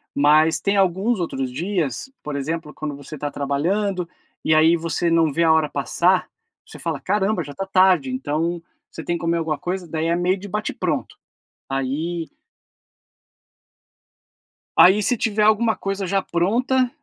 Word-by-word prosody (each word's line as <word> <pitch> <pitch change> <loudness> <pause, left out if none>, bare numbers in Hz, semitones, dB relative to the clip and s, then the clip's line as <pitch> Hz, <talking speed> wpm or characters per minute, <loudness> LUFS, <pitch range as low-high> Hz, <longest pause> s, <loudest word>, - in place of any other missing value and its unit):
Mas 155 +3 +4
tem 200 0 0
alguns 195 +4 +1
outros 135 -7 -3
dias, 170 - -2
por 150 -1 -5
exemplo, 150 +2 -4
quando 150 -2 -5
você 145 +2 -9
tá 145 +1 -4
trabalhando, 180 +6 -1 0.4
e 155 - +3
aí 160 +2 +5
você 165 +1 -1
não 165 -2 +3
vê 170 +4 +1
a 160 - +5
hora 160 -2 +3
passar, - - +1 0.4
você - - -12
fala: - - -3
"Caramba, 195 -2 0
já 145 0 -9
tá 195 - -4
tarde", 185 -7 +3
então, 155 +6 -2 0.3
você - - -8
tem 175 - -1
que - - -11
comer 170 0 0
alguma 160 -2 -1
coisa, 180 0 -4
daí 160 +1 -2
é 170 - +2
meio 180 +2 +1
de 205 +2 -9
bate-pronto. 215 - -3 0.5
Aí 155 +6 -2 2.5
Aí, 195 +3 +6
se 245 - +2
tiver 215 -1 0
alguma 220 +1 +3
coisa 195 -1 -3
já 195 +2 +1
pronta, 245 +10 +1
170 Hz, 160 wpm, -22 LUFS, 155-195 Hz, 2.5 s, Aí